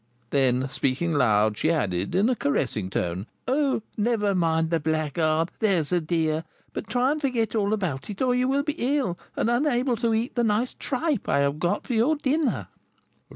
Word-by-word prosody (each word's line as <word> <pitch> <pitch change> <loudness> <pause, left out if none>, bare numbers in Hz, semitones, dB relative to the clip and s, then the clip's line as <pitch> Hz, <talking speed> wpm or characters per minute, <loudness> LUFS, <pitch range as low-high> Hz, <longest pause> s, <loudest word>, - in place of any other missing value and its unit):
Then 130 -1 +2
speaking 135 +5 -1
loud, 110 -6 +2
she 155 - +2
added, 100 - 0
in 200 +4 +3
a 255 - +2
caressing 125 - -1
tone, 90 +2 -2 0.2
"Oh, 270 -3 +1
never 210 -2 +1
mind 165 -2 +1
the 165 - +2
blackguard, 155 +1 0
there's 185 -9 +1
a 175 -1 +2
dear, 160 -1 0 0.3
but - - -5
try 245 +4 +2
and 305 0 -2
forget 245 -6 0
all 205 -2 +1
about 185 -10 -2
it, 200 - -6
or 255 -1 +2
you 250 +1 +1
will 275 +1 +1
be 290 -2 0
ill, 200 -12 -1 0.2
and - - 0
unable 245 0 +1
to 230 0 0
eat 225 +5 0
the 240 - +1
nice 225 +3 +1
tripe 285 - -2
I 140 - +3
have 140 +1 0
got 175 +2 0
for 250 - -3
your 240 +8 +3
dinner." 295 +1 0
195 Hz, 190 wpm, -25 LUFS, 150-250 Hz, 0.3 s, in